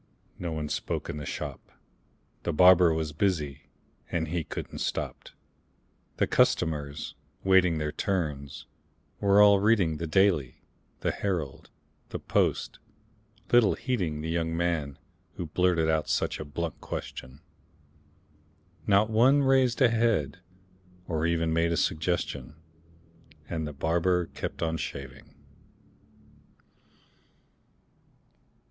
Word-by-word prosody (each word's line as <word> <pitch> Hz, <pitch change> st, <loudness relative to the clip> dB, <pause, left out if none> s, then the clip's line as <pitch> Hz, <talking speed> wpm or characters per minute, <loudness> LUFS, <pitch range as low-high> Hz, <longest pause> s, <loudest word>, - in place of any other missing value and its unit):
No 85 Hz, -2 st, -3 dB
one 80 Hz, -1 st, -3 dB
spoke -, -, -3 dB
in -, -, -7 dB
the 75 Hz, -, -6 dB
shop: -, -, -6 dB, 0.7 s
The 85 Hz, -, -2 dB
barber 90 Hz, +1 st, +6 dB
was 80 Hz, -1 st, -2 dB
busy, 75 Hz, -6 st, -1 dB, 0.5 s
and 80 Hz, -2 st, -1 dB
he 85 Hz, 0 st, -1 dB
couldn't -, -, -7 dB
stop; -, -, -4 dB, 0.9 s
The -, -, +3 dB
customers, 75 Hz, -3 st, 0 dB, 0.3 s
waiting 95 Hz, -3 st, +4 dB
their 75 Hz, -1 st, -2 dB
turns, 75 Hz, -7 st, -3 dB, 0.5 s
were 100 Hz, +1 st, +5 dB
all 100 Hz, -1 st, +6 dB
reading 100 Hz, -7 st, +2 dB
The 85 Hz, -, -4 dB
"Daily," 80 Hz, -8 st, +2 dB, 0.4 s
the -, -, +1 dB
"Herald," 85 Hz, -9 st, -3 dB, 0.4 s
the -, -, -4 dB
"Post," -, -, 0 dB, 0.7 s
little 120 Hz, -4 st, +5 dB
heeding 90 Hz, -12 st, -2 dB
The 80 Hz, -, -4 dB
young 80 Hz, 0 st, -1 dB
man 80 Hz, -5 st, -1 dB, 0.4 s
who 90 Hz, -, -4 dB
blurted 85 Hz, 0 st, +1 dB
out 80 Hz, -1 st, 0 dB
such -, -, 0 dB
a 75 Hz, -, -5 dB
blunt 80 Hz, +2 st, -5 dB
question; 65 Hz, +3 st, -7 dB, 1.5 s
Not 105 Hz, +2 st, +4 dB
one 130 Hz, +6 st, +5 dB
raised 130 Hz, -2 st, +3 dB
a 125 Hz, -, +6 dB
head, 110 Hz, -, +1 dB, 0.7 s
or 80 Hz, -2 st, 0 dB
even 85 Hz, -1 st, 0 dB
made 85 Hz, +1 st, +2 dB
a 85 Hz, -, 0 dB
suggestion; 80 Hz, -1 st, -1 dB, 0.9 s
And 80 Hz, -2 st, -3 dB
the -, -, -5 dB
barber 85 Hz, +4 st, +1 dB
kept -, -, -5 dB
on 80 Hz, 0 st, -1 dB
shaving. 70 Hz, -4 st, -7 dB
85 Hz, 115 wpm, -28 LUFS, 75-95 Hz, 1.5 s, barber